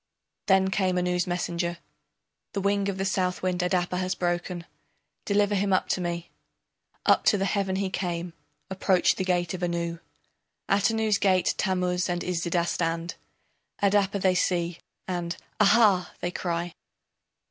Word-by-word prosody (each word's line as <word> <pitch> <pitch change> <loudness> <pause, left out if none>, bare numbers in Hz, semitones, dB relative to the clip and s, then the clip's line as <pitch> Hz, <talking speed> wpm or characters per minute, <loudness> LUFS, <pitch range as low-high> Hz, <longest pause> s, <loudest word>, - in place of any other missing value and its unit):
Then 190 -1 +4
came 185 -2 +1
Anu's 180 0 0
messenger: 175 -1 -2 0.8
The 200 - -1
wing 200 0 +1
of 195 - -3
the 195 - -1
Southwind 185 -2 0
Adapa 180 0 0
has 185 0 -1
broken, 175 0 -2 0.6
Deliver 205 0 +2
him 200 0 +1
up 185 - +2
to 185 - 0
me. 170 -1 -4 0.7
Up - - +4
to 195 -3 +3
heaven 195 -2 0
he 190 -1 -1
came, 175 -2 -3 0.4
approached 190 -1 +2
the 190 - 0
gate 175 -2 0
of 185 - -5
Anu. 170 -1 -2 0.7
At 200 +2 +3
Anu's 220 -2 +1
gate 185 -2 +3
Tammuz 180 -1 0
and 175 0 -1
Iszida 170 -1 0
stand, 165 0 -2 0.7
Adapa 200 0 +2
they 185 -1 +3
see, 175 -2 0 0.3
and 175 -1 -3 0.2
"Aha!" 210 -3 +4
they 175 - -2
cry. 170 -1 -3
180 Hz, 140 wpm, -26 LUFS, 175-195 Hz, 0.8 s, Then